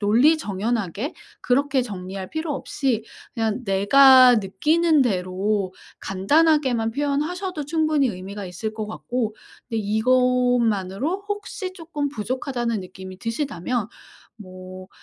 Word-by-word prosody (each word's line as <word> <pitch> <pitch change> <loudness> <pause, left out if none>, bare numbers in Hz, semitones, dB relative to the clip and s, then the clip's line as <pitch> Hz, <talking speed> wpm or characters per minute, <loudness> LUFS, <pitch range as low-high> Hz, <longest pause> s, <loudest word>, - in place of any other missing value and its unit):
논리정연하게 220 - +1 0.3
그렇게 270 +1 +1
정리할 190 -4 -6
필요 315 -1 -3
없이 265 -6 -2 0.3
그냥 225 0 -1
내가 255 +6 +7
느끼는 300 - +2
대로 190 -2 -1 0.3
간단하게만 250 +3 +2
표현하셔도 300 - -2
충분히 310 -2 +1
의미가 200 0 -6
있을 215 +5 -5
것 215 -1 -4
같고. 225 0 -3 0.3
근데 225 - -2
이것만으로 245 - +1
혹시 410 -2 -4
쪼끔 325 -5 -4
부족하다는 240 -2 -3
느낌이 185 0 -10
드신다면 230 - -2 0.5
뭐 185 -2 -11
235 Hz, 280 characters per minute, -23 LUFS, 200-285 Hz, 0.5 s, 내가